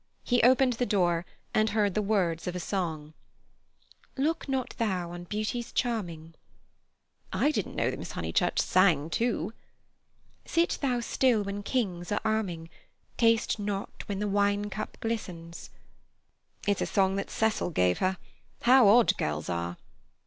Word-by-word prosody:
He 245 Hz, -1 st, +2 dB
opened 255 Hz, +1 st, +5 dB
the 245 Hz, +2 st, -1 dB
door, 175 Hz, -4 st, +1 dB, 0.3 s
and 215 Hz, 0 st, +3 dB
heard 205 Hz, -2 st, +1 dB
the 215 Hz, -, +1 dB
words 185 Hz, -6 st, 0 dB
of 180 Hz, -, -3 dB
a -, -, -2 dB
song: 160 Hz, -5 st, -3 dB, 1.0 s
"Look 310 Hz, +2 st, -1 dB
not 265 Hz, -2 st, -1 dB
thou 185 Hz, -6 st, -1 dB
on 175 Hz, 0 st, -7 dB
beauty's 215 Hz, +4 st, -3 dB
charming." 175 Hz, -10 st, -2 dB, 1.0 s
"I 295 Hz, -, +2 dB
didn't -, -, -3 dB
know -, -, +1 dB
that -, -, -6 dB
Miss -, -, -7 dB
Honeychurch -, -, 0 dB
sang, 165 Hz, -5 st, +3 dB
too." 230 Hz, +4 st, -1 dB, 0.9 s
"Sit 335 Hz, +1 st, +1 dB
thou 250 Hz, -4 st, +1 dB
still 235 Hz, -2 st, +2 dB
when 200 Hz, +1 st, -4 dB
kings 195 Hz, -7 st, -2 dB
are 205 Hz, -, +1 dB
arming, 185 Hz, -7 st, -1 dB, 0.5 s
Taste 230 Hz, -1 st, +3 dB
not 200 Hz, -1 st, -4 dB
when 200 Hz, -, -3 dB
the 210 Hz, +1 st, -1 dB
wine 205 Hz, 0 st, +1 dB
cup 215 Hz, +2 st, -5 dB
glistens——" 175 Hz, -7 st, -5 dB, 1.0 s
"It's 205 Hz, -1 st, +1 dB
a -, -, 0 dB
song 190 Hz, -1 st, +2 dB
that 195 Hz, -, -3 dB
Cecil 220 Hz, -4 st, 0 dB
gave 90 Hz, -, +2 dB
her. 185 Hz, 0 st, +1 dB, 0.5 s
How 250 Hz, -2 st, +7 dB
odd 230 Hz, +3 st, +6 dB
girls 75 Hz, +2 st, -2 dB
are!" 85 Hz, 0 st, -3 dB
205 Hz, 150 wpm, -28 LUFS, 175-230 Hz, 1.0 s, How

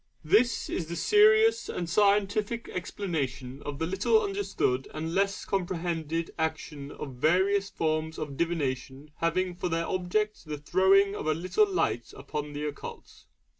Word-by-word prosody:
This 205 Hz, +5 st, +3 dB
is 165 Hz, -, -3 dB
the 170 Hz, -, -4 dB
serious 435 Hz, -, +5 dB
and 175 Hz, -, -3 dB
scientific 205 Hz, +4 st, +2 dB
explanation 145 Hz, -9 st, -3 dB
of 145 Hz, -1 st, -5 dB
the 160 Hz, -, -1 dB
little 195 Hz, -, +3 dB
understood 395 Hz, -, -1 dB
and 160 Hz, +2 st, -3 dB
less 195 Hz, +1 st, 0 dB
comprehended 170 Hz, -3 st, -2 dB
action 155 Hz, -3 st, -3 dB
of 140 Hz, -3 st, -7 dB
various 190 Hz, +7 st, +2 dB
forms 160 Hz, -1 st, -1 dB
of 150 Hz, -3 st, -5 dB
divination 140 Hz, -3 st, -2 dB
having 180 Hz, +2 st, 0 dB
for 180 Hz, 0 st, -3 dB
their 165 Hz, 0 st, 0 dB
object 190 Hz, +4 st, -1 dB
the 150 Hz, -1 st, -4 dB
throwing 190 Hz, +6 st, +4 dB
of 155 Hz, -, -4 dB
a 155 Hz, -, +2 dB
little 390 Hz, -, +2 dB
light 120 Hz, -, -1 dB
upon 145 Hz, +2 st, -5 dB
the 145 Hz, +1 st, -3 dB
occult. 145 Hz, -1 st, -8 dB
170 Hz, 145 wpm, -28 LUFS, 150-200 Hz, -, serious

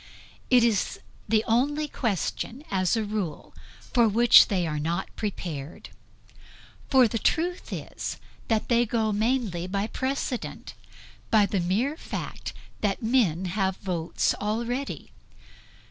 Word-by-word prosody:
It 250 Hz, -2 st, +6 dB
is 225 Hz, -4 st, +1 dB, 0.3 s
the 220 Hz, -1 st, +3 dB
only 290 Hz, +6 st, +1 dB
question, 235 Hz, -, -2 dB
as 185 Hz, +2 st, +2 dB
a 220 Hz, -, 0 dB
rule, 205 Hz, -7 st, -4 dB, 0.4 s
for 235 Hz, -2 st, +5 dB
which 235 Hz, +3 st, +7 dB
they 185 Hz, -4 st, 0 dB
are 150 Hz, -2 st, -2 dB
not 170 Hz, +5 st, -3 dB
prepared. 170 Hz, -8 st, -5 dB, 1.0 s
For 260 Hz, -3 st, +6 dB
the 225 Hz, +1 st, -2 dB
truth 350 Hz, -, 0 dB
is -, -, -5 dB, 0.3 s
that 220 Hz, -2 st, +1 dB
they 235 Hz, -1 st, +4 dB
go 220 Hz, -1 st, +1 dB
mainly 215 Hz, -5 st, 0 dB
by 200 Hz, +2 st, -1 dB
precedent; 260 Hz, +1 st, -3 dB, 0.6 s
by 215 Hz, -2 st, +5 dB
the 200 Hz, -1 st, -1 dB
mere 210 Hz, -, 0 dB
fact -, -, -6 dB, 0.3 s
that 205 Hz, +1 st, -1 dB
men 215 Hz, -8 st, +2 dB
have 190 Hz, 0 st, -1 dB
votes 175 Hz, -4 st, -1 dB
already. 235 Hz, +6 st, -3 dB
215 Hz, 125 wpm, -26 LUFS, 190-240 Hz, 1.0 s, which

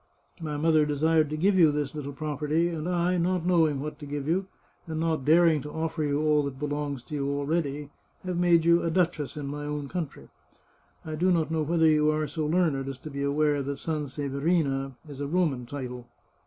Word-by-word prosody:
My 150 Hz, -2 st, -3 dB
mother 155 Hz, 0 st, +4 dB
desired 155 Hz, +1 st, +2 dB
to 155 Hz, -, -3 dB
give 190 Hz, +4 st, +3 dB
you 160 Hz, -3 st, +7 dB
this 145 Hz, -1 st, -2 dB
little 145 Hz, -2 st, -5 dB
property, 150 Hz, +3 st, -1 dB
and 165 Hz, 0 st, -3 dB
I, 180 Hz, 0 st, +1 dB
not 175 Hz, 0 st, 0 dB
knowing 160 Hz, -5 st, +3 dB
what 150 Hz, +1 st, -5 dB
to 145 Hz, -, -8 dB
g^ve 145 Hz, -1 st, -4 dB
you, 185 Hz, +5 st, 0 dB, 0.4 s
and 160 Hz, -1 st, -3 dB
not 160 Hz, -4 st, 0 dB
daring 160 Hz, -1 st, +5 dB
to 150 Hz, -, -7 dB
offer 160 Hz, 0 st, -2 dB
you 145 Hz, -1 st, 0 dB
all 150 Hz, -1 st, +4 dB
that 135 Hz, -2 st, -5 dB
belongs 145 Hz, -2 st, -3 dB
to -, -, -11 dB
you 140 Hz, -1 st, -1 dB
already, 145 Hz, 0 st, -2 dB, 0.3 s
have 180 Hz, -1 st, -2 dB
made 170 Hz, -2 st, +4 dB
you 170 Hz, 0 st, +5 dB
a 165 Hz, -, 0 dB
duchess 165 Hz, -4 st, 0 dB
in 145 Hz, -, -4 dB
my 145 Hz, +1 st, -5 dB
own 145 Hz, -1 st, -3 dB
country. 175 Hz, -5 st, -5 dB, 0.8 s
I 155 Hz, -, -5 dB
do 175 Hz, +4 st, +1 dB
not 160 Hz, -3 st, +1 dB
know 160 Hz, -1 st, +1 dB
whether 160 Hz, +2 st, +2 dB
you 155 Hz, -1 st, +4 dB
are 155 Hz, 0 st, 0 dB
so 150 Hz, +1 st, -3 dB
learned 155 Hz, -5 st, +1 dB
as 135 Hz, -, -6 dB
to 150 Hz, +3 st, -9 dB
be 140 Hz, 0 st, -4 dB
aware 145 Hz, +1 st, +1 dB
that 140 Hz, +1 st, -3 dB
Sanseverina 140 Hz, -1 st, -1 dB
is 145 Hz, -1 st, -8 dB
a 140 Hz, -, -2 dB
Roman 145 Hz, -7 st, 0 dB
title. 125 Hz, -3 st, -6 dB
150 Hz, 210 wpm, -27 LUFS, 145-165 Hz, 0.8 s, you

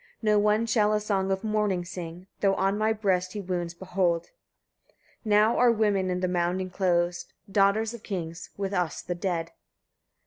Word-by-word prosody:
No 210 Hz, -1 st, +4 dB
one 210 Hz, +2 st, +2 dB
shall 215 Hz, -2 st, +2 dB
a 210 Hz, -, +2 dB
song 195 Hz, -2 st, -1 dB
of 190 Hz, +1 st, -1 dB
mourning 210 Hz, -4 st, 0 dB
sing, 175 Hz, 0 st, -7 dB
though 195 Hz, -1 st, +3 dB
on 195 Hz, +1 st, +1 dB
my 215 Hz, +1 st, +1 dB
breast 190 Hz, -4 st, 0 dB
he 210 Hz, -, -4 dB
wounds 175 Hz, -3 st, -3 dB
behold. 175 Hz, -2 st, -1 dB, 0.9 s
Now 215 Hz, +1 st, +3 dB
are 245 Hz, -1 st, +5 dB
women 205 Hz, -4 st, +1 dB
in 180 Hz, 0 st, -1 dB
the 185 Hz, -, +1 dB
mound 180 Hz, 0 st, 0 dB
enclosed, 180 Hz, -2 st, -1 dB, 0.2 s
daughters 205 Hz, +3 st, +3 dB
of 235 Hz, -, -9 dB
kings, 170 Hz, -6 st, -5 dB
with 200 Hz, 0 st, -3 dB
us 180 Hz, -4 st, -1 dB
the 175 Hz, -, -3 dB
dead. 170 Hz, -2 st, -2 dB
190 Hz, 170 wpm, -27 LUFS, 180-210 Hz, 0.9 s, are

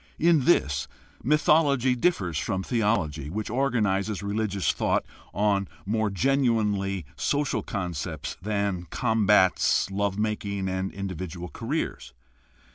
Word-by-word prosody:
In 165 Hz, -5 st, +3 dB
this, 70 Hz, -, +2 dB, 0.3 s
mythology 140 Hz, -3 st, +3 dB
differs 95 Hz, -, 0 dB
from 95 Hz, 0 st, -2 dB
theology, 100 Hz, -, 0 dB
which 105 Hz, +5 st, -4 dB
organizes 110 Hz, -6 st, 0 dB
religious 100 Hz, -1 st, 0 dB
thought -, -, 0 dB, 0.3 s
on 100 Hz, -1 st, +1 dB, 0.2 s
more 110 Hz, +1 st, 0 dB
genuinely 105 Hz, -, +1 dB
social 145 Hz, -1 st, 0 dB
concepts 85 Hz, -6 st, -4 dB
than 100 Hz, -3 st, -1 dB
combats, 105 Hz, -5 st, +3 dB
love 100 Hz, 0 st, -1 dB
making, 100 Hz, -2 st, -2 dB
and 95 Hz, 0 st, -2 dB
individual 90 Hz, -2 st, -5 dB
careers. -, -, -4 dB
100 Hz, 105 wpm, -26 LUFS, 95-115 Hz, 0.3 s, In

